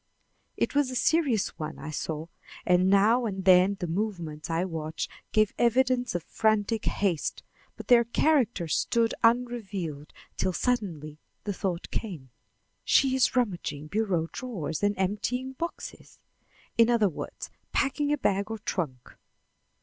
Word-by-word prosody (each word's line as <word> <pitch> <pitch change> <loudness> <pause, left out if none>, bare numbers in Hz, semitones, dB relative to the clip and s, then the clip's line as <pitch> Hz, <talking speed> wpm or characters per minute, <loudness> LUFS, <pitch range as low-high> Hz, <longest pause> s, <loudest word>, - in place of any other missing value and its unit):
It - - 0
was 285 -2 +2
a 255 - -5
serious 270 - +2
one, 155 0 -5
I 155 - -7
saw, 155 +1 -3 0.4
and 180 +1 +4
now 220 +5 +4
and 190 -2 -4
then 185 +1 +6
the 180 - -2
movements 170 -4 -3
I 165 +2 0
watched 160 -3 -4 0.2
gave 215 -1 +3
evidence 245 -1 +2
of 175 - -2
frantic 220 +2 0
haste, 185 -7 -1 0.3
but - - -9
their 240 -2 +7
character 240 - +2
stood 230 +8 +1
unrevealed 210 -11 0 0.3
till 185 -1 0
suddenly 170 - -2 0.2
the 205 - -2
thought 180 -2 -3
came: 160 - -5 0.5
"She 265 -1 +4
is 260 0 +2
rummaging 175 - -1
bureau 190 -5 0
drawers 185 - -4
and 205 0 +1
emptying 210 +7 -1
boxes, 335 +6 -7 0.6
in 230 0 +6
other 235 -3 +4
words, 170 - -7 0.2
packing 290 +1 +1
a 295 - +2
bag 200 -5 0
or 225 - -3
trunk." 155 - -4
205 Hz, 140 wpm, -28 LUFS, 170-240 Hz, 0.6 s, their